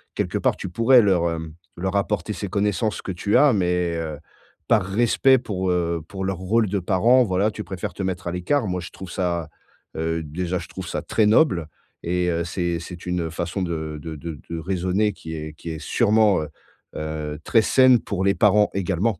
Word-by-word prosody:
quelque - - -1
part, - - +1
tu - - -6
pourrais 115 +7 +5
leur, 90 -5 +2
hem, 80 -1 -5 0.2
leur 95 +2 -2
apporter 105 +1 -1
ces 100 - -5
connaissances 105 +1 0
que 95 - -5
tu 100 +4 +1
as 145 -3 +6
mais 90 -3 0
heu, 80 -3 -4 0.5
par 110 -4 +4
respect 120 +6 +3
pour, 95 -5 -3
heu, 85 -2 0
pour 95 +1 -6
leur 95 -2 -2
rôle 105 +3 +1
de 100 0 0
parents, 115 +8 +4
voilà, 100 +2 +1
tu - - -6
préfères 95 -1 -5
te - - -6
mettre 95 -1 -3
à 85 - -1
l'écart. 110 +9 0
Moi 90 0 -2
je - - -9
trouve 95 -3 -9
ça, 85 -3 -2 0.5
heu, 80 0 -1
déjà, 85 +4 -3
je 85 - -9
trouve 95 -2 -7
ça - - -3
très 110 - +1
noble 105 - +3 0.4
et 90 +1 0
heu, 85 0 0
c'est 85 -1 -2
c'est 85 +1 -9
une, 90 -1 -1
heu, 80 - -3
façon 85 +3 -3
de 80 -3 -4
de 80 0 -6
de 80 0 -7
de 85 - -4
raisonner 95 +4 0
qui 80 0 -8
est 75 0 -6
qui 85 +2 -9
est 80 - -5
sûrement, 110 -1 +3
heu, - - -6 0.5
heu, 75 -1 -4
très 115 - +4
saine 130 +1 +5
pour 95 -3 -3
les 100 0 +3
parents 105 +3 +4
également. 100 +1 0
90 Hz, 210 wpm, -23 LUFS, 85-105 Hz, 0.5 s, as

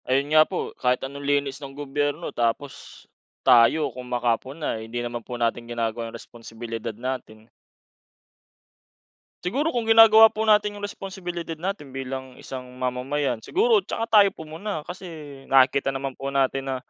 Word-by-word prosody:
Ayun 140 +3 +1
nga 155 - +8
po 185 - -4
kahit 125 +1 +1
anong 140 +1 -7
linis 140 -1 0
ng 135 0 -9
gobyerno, 145 +3 -2
tapos 120 +4 -3 0.4
tayo 120 +6 +5
kung 125 +1 -8
makapuna 125 +4 -1
eh - - -7
hindi 120 - -5
naman 120 0 -4
po - - -8
natin 120 0 -1
ginagawa 115 -1 -2
yung 115 - -8
responsibilidad 115 -1 -7
natin. 120 -3 -6 2.0
Siguro 275 - 0
kung 235 -2 -1
ginagawa 225 0 +9
po 220 +1 -3
natin 210 -1 +3
yung 205 - -4
responsibilidad 175 -5 -6
natin 175 -4 -4
bilang 130 -1 -6
isang 125 -1 -9
mamamayan, 125 0 -2
siguro 435 - +3
tsaka 225 - +3
tayo 200 - +4
pumuna 160 +1 -6
kasi 180 0 -8 0.4
nakikita 135 +1 +4
naman 135 0 -3
po 135 +2 -5
natin 135 0 0
na, 135 - -1
135 Hz, 150 wpm, -24 LUFS, 125-180 Hz, 2.0 s, ginagawa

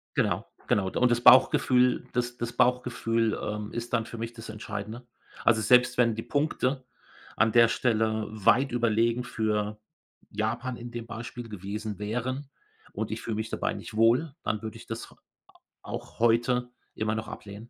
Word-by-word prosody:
Genau, - - +1 0.2
genau, 95 -2 +2
und 125 0 +3
das 120 0 +2
Bauchgefühl 125 0 +5
das 120 0 -1
das 120 0 -4
Bauchgefühl, 120 -3 +1
ähm, 105 0 -4
ist 120 +1 -5
dann 115 -2 +1
für 115 - -8
mich 115 +1 -4
das 115 -1 -10
Entscheidende. 110 +3 -6 0.4
Also, 110 -2 +4
selbst 125 +3 +4
wenn 115 -2 +4
die 115 - -4
Punkte 140 -3 -1 0.5
an 110 0 +3
der 115 0 +6
Stelle 110 -2 0
weit 110 +5 +3
überlegen 115 0 +1
für 105 -2 -2 0.5
Japan 115 +4 -2
in 120 0 -8
dem 120 -1 -6
Beispiel 120 0 -7
gewesen 105 +1 -5
wären 125 +6 -3 0.4
und 110 +1 -4
ich 110 - -4
fühle 110 - -3
mich 110 +1 -3
dabei - - -1
nicht 115 - -8
wohl, 120 +7 +3
dann 110 - -2
würde 110 -2 -6
ich - - -12
das - - -6
h - - -19
a - - -33 0.6
auch - - -7
heute 120 +2 +2 0.3
immer 110 0 -1
noch 110 0 -4
ablehnen. 105 +2 -9
115 Hz, 170 wpm, -28 LUFS, 110-125 Hz, 0.6 s, der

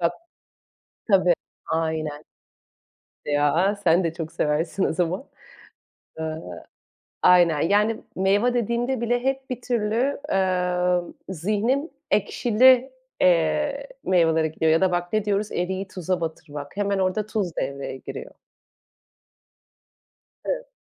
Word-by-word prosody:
Bak 170 0 +2 1.0
Tabii, 185 -2 +5 0.4
aynen. 160 -2 -2 1.0
Ya, 145 +7 +2
sen 170 +2 +4
de 165 -1 -1
çok 165 -1 -6
seversin 160 +5 0
o - - +2
zaman. 180 - -1 0.9
Iıı, 155 - -5 0.6
aynen. 175 -4 +5
Yani, 210 +5 +2
meyve 200 +6 +2
dediğimde 240 +2 0
bile 245 +1 0
hep 270 0 -1
bir 250 -1 -4
türlü, 240 +3 0
emm, 180 -2 +1 0.2
zihnim 215 - 0 0.2
ekşili, 255 +2 +4 0.3
eee, 275 - +2 0.2
meyvelere 165 -3 +3
gidiyor 160 +1 +1
ya 160 - +3
da 190 -1 +3
bak 175 +1 -2
ne 215 -1 +1
diyoruz, 205 0 0
eriği 190 +2 -2
tuza 185 -1 -3
batırmak. 150 -1 -6
Hemen 200 -1 0
orada 190 +3 0
tuz 205 -6 -2
devreye 140 0 -3
giriyor. - - -8 2.1
Evet. - - -3
185 Hz, 110 wpm, -24 LUFS, 165-220 Hz, 2.1 s, Tabii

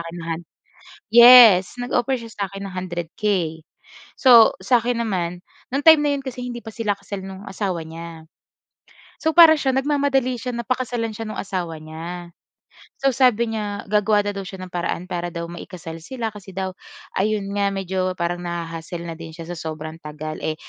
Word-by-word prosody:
akin 165 +1 -8
ng 165 - -8
han 165 - -8 0.7
yes, 235 -5 +9
nag-offer 245 +1 0
siya 230 - -10
sa 200 -3 -3
akin 195 +1 -8
ng - - -12
100 175 -2 -4
K. 180 -7 0 0.6
So 240 -4 +7
sa 240 +5 +4
akin 235 0 -1
naman, 180 -4 -2 0.3
no'ng 275 +2 -1
time 320 -1 +8
na 290 - +2
'yon 275 - -6
kasi 250 -2 -6
hindi 240 -1 -5
pa 225 - -8
sila 210 -3 -1
kasal 200 -1 -7
no'ng 195 +1 -9
asawa 190 -4 -3
niya. 165 0 -9 1.0
So, 320 - +1
para 325 -1 +8
siya, 270 -2 0
nagmamadali 270 -2 +1
siya 250 +1 -5
na 235 - -3
pakasalan 245 -3 -2
siya 225 - -5
nung 215 - -4
asawa 175 -5 -4
niya. 170 +3 -8 0.7
So 275 - +4
sabi 235 -3 +3
niya, 205 -2 -4
gagawa 210 0 +3
na - - 0
daw 195 - -4
siya 190 -1 -8
ng 185 - -8
paraan 175 0 -3
para 175 0 -2
daw 170 0 -4
ma-i-kasal 170 -1 -8
sila 230 +6 -4
kasi 200 -2 -12
daw 190 0 -2 0.5
ayun 205 0 0
nga, 200 -1 +1
medyo 185 -1 -2
parang 170 +1 -1
naha-hassle 170 0 -5
na 165 - -5
din 165 -1 -8
siya 165 - -8
sa 175 - -5
sobrang 155 0 -6
tagal. 155 +1 -6
Eh, 155 - -1
195 Hz, 190 wpm, -22 LUFS, 170-235 Hz, 1.0 s, yes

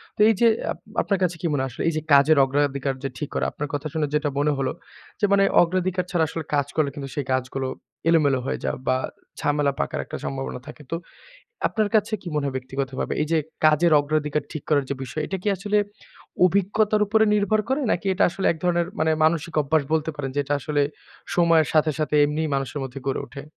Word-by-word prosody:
তো - - -29
এই - - +5
যে, 235 - +7 0.2
আপ - - -5 0.2
আপনার 200 -2 0
কাছে 180 -1 +1
কি - - -4
মনে 145 -3 0
হয় 135 - -2
আসলে - - -5
এই - - -2
যে - - -1
কাজের 140 +2 +6
অগ্রাধিকার 140 0 0
যে 135 - -1
ঠিক 150 - -4
করা, - - +1
আপনার 150 - -4
কথা 145 +1 -2
শুনে 155 -2 0
যেটা 150 0 +1
মনে 150 +1 +2
হলো 135 -1 0 0.5
যে, 210 - +3
মানে 195 0 +5 0.2
অগ্রাধিকার 180 +1 0
ছাড়া 170 -3 +2
আসলে 165 -1 -4
কাজ 145 -1 +1
করলে 155 -3 +2
কিন্তু 140 -2 -6
সেই 145 - -2
কাজগুলো 130 +1 -2 0.4
এলোমেলো 145 -5 +4
হয়ে - - -2
যায় - - -1
বা 130 - +3 0.4
ঝামেলা 145 -1 +1
পাকার - - -2
একটা - - -6
সম্ভাবনা 135 -2 -4
থাকে। 150 0 -10
তো, - - 0 0.7
আপনার 215 -1 0
কাছে 215 +1 +2
কি 180 - -6
মনে 150 - 0
হয়, 135 - -3
ব্যক্তিগতভাবে? 130 +1 -3
এই - - -1
যে 165 - +4 0.3
কাজের 155 +2 +4
অগ্রাধিকার 150 0 -1
ঠিক 155 - -5
করার 145 -3 +3
যে - - 0
বিষয়, 155 +4 -4
এটা 190 - -3
কি 210 - 0
আসলে, 210 +2 0 0.7
অভিজ্ঞতার 205 +3 +2
উপরে 220 +1 +4
নির্ভর 210 +1 +2
করে, 270 +3 +1
নাকি 185 - -2
এটা 200 - +3
আসলে 190 +2 -2
এক - - -10
ধরনের 175 -1 +2
মানে, 160 0 +3
মানসিক 165 0 +1
অভ্যাস 150 +2 +2
বলতে 160 0 0
পারেন 135 -2 -3
যে, - - +3
এটা 145 +2 0
আসলে 145 +1 0 0.5
সময়ের 165 -2 +4
সাথে, 155 0 +3
সাথে 155 -1 -1
এমনিই 155 +2 -1
মানুষের 135 +1 -2
মধ্যে 130 +1 -7
গড়ে 135 - -1
ওঠে? 140 0 -9
155 Hz, 215 wpm, -24 LUFS, 140-175 Hz, 0.7 s, যে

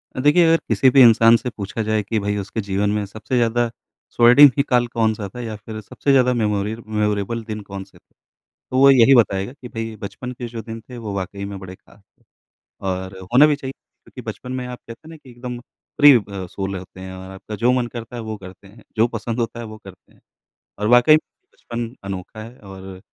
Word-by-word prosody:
अ, - - -4
देखिए 150 +5 +5
अगर 165 - +5
किसी 130 - +4
भी 135 +1 +6
इंसान 115 -1 +7
से 125 - -5
पूछा 105 +1 -5
जाए 110 0 0
कि 110 +2 -1
भई 100 0 -2
उसके 105 +3 -4
जीवन 100 +1 -1
में 105 -1 -1
सबसे 110 +4 -5
ज़्यादा 120 0 +1 0.4
स्वर्णिम 125 +5 +8
ही 140 - +3
काल 125 -1 +3
कौन-सा 110 -3 -1
था - - -6
या 110 -2 -5
फिर 110 +1 -8
सबसे 140 +7 -2
ज़्यादा 125 -2 +4
मेमोरियल 105 -1 -1
मेमोरेबल 105 +1 -1
दिन 110 -1 -6
कौन 100 -1 -7
से - - -21
थे? - - -30 0.6
तो 130 - 0
वो 140 +1 +7
यही 135 0 +6
बताएगा 100 -1 +2
कि 135 -3 -11
भई 115 -1 -5
बचपन 100 +5 -6
के 120 -1 -7
जो 115 -1 -7
दिन 115 0 -8
थे 125 - -8
वो 110 -4 -6
वाक़ई 100 +1 -5
में 100 0 -6
बड़े 95 -1 -9
ख़ास 100 - -23 0.2
थे - - -32 0.6
और 95 0 -3 0.2
होना 135 +5 +7
भी 150 -1 +2
चाहिए, 135 -2 -6
क्योंकि - - -16
बचपन 125 - -8
में 130 -1 -4
आप 125 0 -7
कहते 115 0 -12
हैं - - -11
ना 165 - -10
कि 140 -4 -17
एकदम 120 0 -7 0.4
फ्री 145 -2 +9
ब 100 -3 -7
सोल 95 0 -4
होते 95 0 -10
हैं 95 0 -8
और 95 0 -10
आपका 95 +3 -9
जो 120 +4 +2
मन 125 -1 +1
करता 120 0 -8
है 120 - -5
वो 110 -1 -5
करते 95 0 -13
हैं, 105 +3 -17
जो 110 +1 +4
पसंद 115 0 -4
होता 115 0 -3
है 115 - -6
वो 110 0 -10
करते 95 -2 -15
हैं। - - -27 0.6
और 105 - -1
वाक़ई 120 +5 +6
में 155 - +4 0.3
बचपन 120 -1 -5 0.2
अनोखा 100 +2 -7
है 115 +3 -12
और 95 -2 -11
110 Hz, 230 wpm, -21 LUFS, 100-125 Hz, 0.6 s, फ्री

